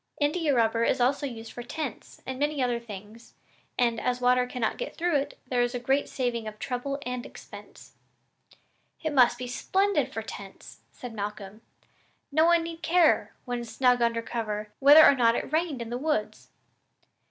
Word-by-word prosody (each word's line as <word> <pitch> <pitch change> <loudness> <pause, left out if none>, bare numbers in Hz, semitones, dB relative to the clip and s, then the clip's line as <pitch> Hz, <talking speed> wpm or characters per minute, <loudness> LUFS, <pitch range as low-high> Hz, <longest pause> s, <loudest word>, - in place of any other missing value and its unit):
India 300 +1 +1
rubber 230 -2 +2
is 255 - +1
also 275 +4 +1
used 225 -3 -8
for 245 - -7
tents 265 0 -7
and 260 0 -5
many 295 0 0
other 245 -2 0
things, 215 0 -11 0.4
and, 235 -2 +1
as 250 0 -1
water 250 0 +3
cannot 245 -3 -2
get - - -5
through 345 -1 0
it, 280 0 -1
there 250 -1 0
is 245 +1 0
a - - -2
great 265 +3 0
saving 240 -4 -2
of 215 0 -7
trouble 260 +4 -3
and 250 -1 -3
expense." - - -13 1.1
"It 315 -2 -1
must 245 -3 +5
be 250 - -5
splendid 385 +11 0
for - - -4
tents," - - -10
said 245 -2 -9
Malcolm; 205 0 -6 0.7
"no 315 +3 +4
one 340 0 +4
need 330 0 -7
care, 330 +1 +3
when 245 -2 -3
snug 245 +1 +2
under 230 -1 +1
cover, 215 -3 -4
whether 290 +3 +9
or - - +7
not 235 -3 +3
it 270 - -4
rained 310 -6 0
in 230 - -9
the 245 - -3
woods." 290 -8 -2
250 Hz, 175 wpm, -27 LUFS, 235-290 Hz, 1.1 s, whether